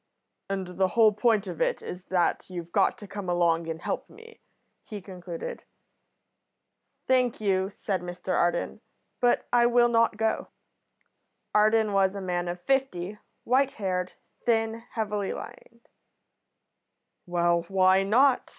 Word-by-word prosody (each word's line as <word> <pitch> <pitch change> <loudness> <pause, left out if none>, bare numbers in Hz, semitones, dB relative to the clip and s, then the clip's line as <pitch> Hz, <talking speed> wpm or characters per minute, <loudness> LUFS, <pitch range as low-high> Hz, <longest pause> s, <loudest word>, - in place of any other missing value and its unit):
"And 190 -2 -4
the 190 - +4
whole 220 -2 +7
point 215 -1 +2
of 175 -4 -6
it - - 0
is 180 +1 -7
that 180 -1 0
you've 175 -2 -7
got - - +2
to 205 - -11
come 200 -1 -6
along 170 -1 +2
and 160 0 -4
help - - -4
me," 460 +1 -15 0.4
he 210 - -8
concluded. 180 -3 -7 1.4
"Thank 255 -2 +2
you," 190 -2 +1
said 195 -2 -3
Mr 180 +1 -4
Arden, 175 0 0 0.4
"but 245 -2 +2
I 240 -1 +5
will 240 0 +4
not 230 -2 +2
go." 220 0 0 1.1
Arden 215 0 +3
was 195 0 +2
a - - -4
man 175 -1 -2
of 175 +1 -4
fifty, 215 -8 -1 0.2
white 265 +2 +2
haired, 185 -3 -2 0.3
thin, 225 -1 +1
heavily 210 -3 -2
lined. 235 0 -11 1.4
"Well, 170 -1 +1
why 190 0 +4
not?" 245 +7 +3
195 Hz, 135 wpm, -27 LUFS, 180-225 Hz, 1.4 s, whole